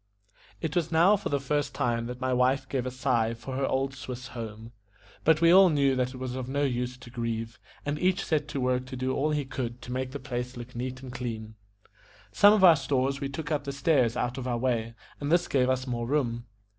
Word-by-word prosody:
It -, -, -3 dB
was 170 Hz, -3 st, 0 dB
now 170 Hz, +6 st, +5 dB
for 205 Hz, -, -4 dB
the 140 Hz, -, +1 dB
first 145 Hz, +2 st, -1 dB
time 115 Hz, -1 st, 0 dB
that 125 Hz, 0 st, -6 dB
my 130 Hz, 0 st, 0 dB
wife 125 Hz, +2 st, +2 dB
gave 130 Hz, -2 st, -2 dB
a -, -, 0 dB
sigh 125 Hz, -3 st, 0 dB
for 115 Hz, +3 st, -7 dB
her 135 Hz, 0 st, 0 dB
old 135 Hz, +1 st, 0 dB
Swiss 130 Hz, -1 st, -7 dB
home. 115 Hz, -2 st, -7 dB, 0.5 s
But 160 Hz, 0 st, +4 dB
we 165 Hz, 0 st, +6 dB
all 190 Hz, 0 st, +8 dB
knew 140 Hz, -3 st, +2 dB
that 130 Hz, 0 st, -1 dB
it -, -, -8 dB
was 130 Hz, -1 st, -4 dB
of 130 Hz, -1 st, -4 dB
no 140 Hz, +2 st, 0 dB
use 125 Hz, -2 st, -1 dB
to 120 Hz, -1 st, -13 dB
grieve, 115 Hz, 0 st, -4 dB, 0.3 s
and 145 Hz, +1 st, -2 dB
each 185 Hz, +1 st, +1 dB
set 150 Hz, -3 st, 0 dB
to 145 Hz, -, -4 dB
work 125 Hz, 0 st, 0 dB
to 130 Hz, -, -6 dB
do 130 Hz, +1 st, -1 dB
all 145 Hz, +3 st, +1 dB
he 150 Hz, -2 st, 0 dB
could 125 Hz, -2 st, -4 dB
to 125 Hz, -, -7 dB
make 130 Hz, +1 st, -2 dB
the 140 Hz, -, -5 dB
place 125 Hz, -2 st, -5 dB
look 120 Hz, +1 st, -9 dB
neat 130 Hz, +2 st, -5 dB
and 125 Hz, -2 st, -8 dB
clean. 110 Hz, -3 st, -5 dB, 0.8 s
Some 205 Hz, -, +7 dB
of 210 Hz, -2 st, +3 dB
our 170 Hz, -4 st, +9 dB
stores 135 Hz, 0 st, 0 dB
we 140 Hz, -, -2 dB
took 150 Hz, +3 st, -5 dB
up 145 Hz, -2 st, 0 dB
the 140 Hz, -, -3 dB
stairs 135 Hz, -4 st, +2 dB
out 125 Hz, +2 st, -2 dB
of 130 Hz, -, -4 dB
our 120 Hz, -1 st, 0 dB
way, 115 Hz, -2 st, -1 dB, 0.2 s
and 145 Hz, +1 st, -2 dB
this 175 Hz, +1 st, +3 dB
gave 130 Hz, -2 st, +2 dB
us 130 Hz, 0 st, 0 dB
more 120 Hz, -2 st, -3 dB
room. 120 Hz, -4 st, 0 dB
130 Hz, 240 wpm, -28 LUFS, 125-140 Hz, 0.8 s, our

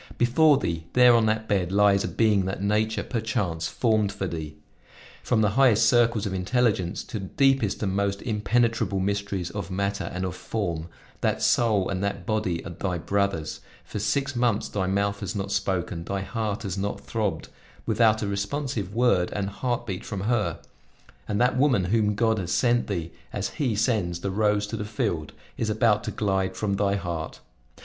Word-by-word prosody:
Before 140 Hz, +5 st, +5 dB
thee, 85 Hz, -10 st, -3 dB
there 125 Hz, -1 st, +7 dB
on 115 Hz, -2 st, +4 dB
that 110 Hz, 0 st, 0 dB
bed, 95 Hz, -4 st, 0 dB
lies 100 Hz, 0 st, +4 dB
a -, -, -1 dB
being 105 Hz, -4 st, +2 dB
that 95 Hz, 0 st, -3 dB
nature, 105 Hz, +1 st, +1 dB
perchance, 105 Hz, -9 st, -2 dB
formed 110 Hz, -2 st, +1 dB
for 100 Hz, -1 st, -4 dB
thee. 80 Hz, -4 st, -5 dB, 0.7 s
From 115 Hz, -3 st, +1 dB
the 105 Hz, -2 st, +3 dB
highest 115 Hz, -2 st, +4 dB
circles 115 Hz, -2 st, +3 dB
of 100 Hz, -, -2 dB
intelligence 100 Hz, -1 st, 0 dB
to 110 Hz, -, -6 dB
the 95 Hz, -, -5 dB
deepest 135 Hz, -4 st, +2 dB
and 95 Hz, -2 st, -1 dB
most 100 Hz, 0 st, 0 dB
impenetrable 110 Hz, -2 st, +1 dB
mysteries 100 Hz, -2 st, -2 dB
of 100 Hz, -3 st, -5 dB
matter 100 Hz, +1 st, -2 dB
and 90 Hz, +1 st, -3 dB
of 90 Hz, -1 st, -4 dB
form, 85 Hz, -8 st, -3 dB, 0.3 s
that -, -, 0 dB
soul 110 Hz, -5 st, +3 dB
and 95 Hz, 0 st, -2 dB
that 100 Hz, -2 st, -2 dB
body 105 Hz, -6 st, -1 dB
are 85 Hz, -, -6 dB
thy 90 Hz, +1 st, -2 dB
brothers; 95 Hz, -3 st, -1 dB, 0.3 s
for 105 Hz, -, -5 dB
six 135 Hz, +6 st, 0 dB
months 120 Hz, -3 st, +1 dB
thy 95 Hz, -2 st, -1 dB
mouth 100 Hz, +1 st, 0 dB
has 100 Hz, -2 st, -4 dB
not 100 Hz, 0 st, -3 dB
spoken, 95 Hz, -3 st, -1 dB
thy 100 Hz, +2 st, -3 dB
heart 110 Hz, +1 st, -3 dB
has 95 Hz, -1 st, -3 dB
not 100 Hz, +1 st, -2 dB
throbbed, 105 Hz, -8 st, -2 dB, 0.4 s
without 110 Hz, -2 st, +3 dB
a -, -, -1 dB
responsive 100 Hz, 0 st, -3 dB
word 115 Hz, -7 st, +3 dB
and 100 Hz, -1 st, -2 dB
heart 120 Hz, +3 st, -2 dB
beat 95 Hz, -5 st, -4 dB
from 100 Hz, -3 st, -5 dB
her; 105 Hz, -6 st, 0 dB, 0.7 s
and 105 Hz, -1 st, -1 dB
that 125 Hz, +1 st, +3 dB
woman 130 Hz, -8 st, +3 dB
whom 105 Hz, -2 st, +2 dB
God 110 Hz, 0 st, +2 dB
has 90 Hz, -2 st, -4 dB
sent 120 Hz, +2 st, +2 dB
thee 85 Hz, -5 st, -3 dB, 0.2 s
as -, -, -2 dB
He 125 Hz, -7 st, -1 dB
sends 100 Hz, -6 st, 0 dB
the 100 Hz, -, -2 dB
rose 105 Hz, +1 st, +2 dB
to 105 Hz, -, -5 dB
the -, -, -3 dB
field, 95 Hz, -7 st, -2 dB, 0.2 s
is 110 Hz, -, -1 dB
about 110 Hz, -1 st, +2 dB
to -, -, -2 dB
glide 95 Hz, -2 st, -1 dB
from 100 Hz, -2 st, -1 dB
thy 100 Hz, 0 st, +1 dB
heart. 85 Hz, -5 st, -4 dB
100 Hz, 185 wpm, -26 LUFS, 95-110 Hz, 0.7 s, there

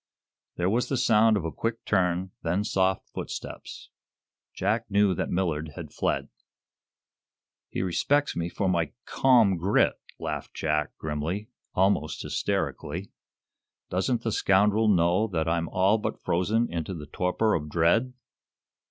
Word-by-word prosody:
There 90 Hz, -, 0 dB
was 115 Hz, +6 st, +1 dB
the 135 Hz, -, 0 dB
sound 110 Hz, -3 st, +4 dB
of 85 Hz, -, -3 dB
a 80 Hz, -, -2 dB
quick 115 Hz, +5 st, -3 dB
turn, 90 Hz, -1 st, +1 dB
then 90 Hz, +5 st, 0 dB
soft 95 Hz, -1 st, 0 dB
footsteps. -, -, -7 dB, 0.6 s
Jack 110 Hz, +4 st, -1 dB
knew 100 Hz, -1 st, +3 dB
that -, -, -2 dB
Millard 80 Hz, -4 st, -1 dB
had -, -, -8 dB
fled. -, -, -1 dB, 1.4 s
"He -, -, -2 dB
respects 145 Hz, +11 st, +1 dB
me 85 Hz, 0 st, -2 dB
for 100 Hz, -, -2 dB
my 85 Hz, -5 st, 0 dB
'calm 115 Hz, -8 st, +4 dB
grit'!" 95 Hz, +5 st, +2 dB, 0.2 s
laughed -, -, -5 dB
Jack, 75 Hz, -1 st, -1 dB
grimly 80 Hz, +8 st, -3 dB, 0.3 s
almost 85 Hz, -6 st, +1 dB
hysterically. 90 Hz, +6 st, -2 dB, 0.8 s
"Doesn't 115 Hz, +6 st, 0 dB
the 115 Hz, -, -1 dB
scoundrel 105 Hz, +2 st, +3 dB
know 90 Hz, +2 st, +3 dB
that 85 Hz, -5 st, -1 dB
I'm 85 Hz, 0 st, 0 dB
all 95 Hz, +4 st, +3 dB
but -, -, -3 dB
frozen 110 Hz, +7 st, +1 dB
into 85 Hz, +2 st, -3 dB
the 75 Hz, -3 st, -7 dB
torpor 90 Hz, +8 st, 0 dB
of 75 Hz, -1 st, -2 dB
dread?" 85 Hz, -, +2 dB
95 Hz, 135 wpm, -27 LUFS, 85-110 Hz, 1.4 s, sound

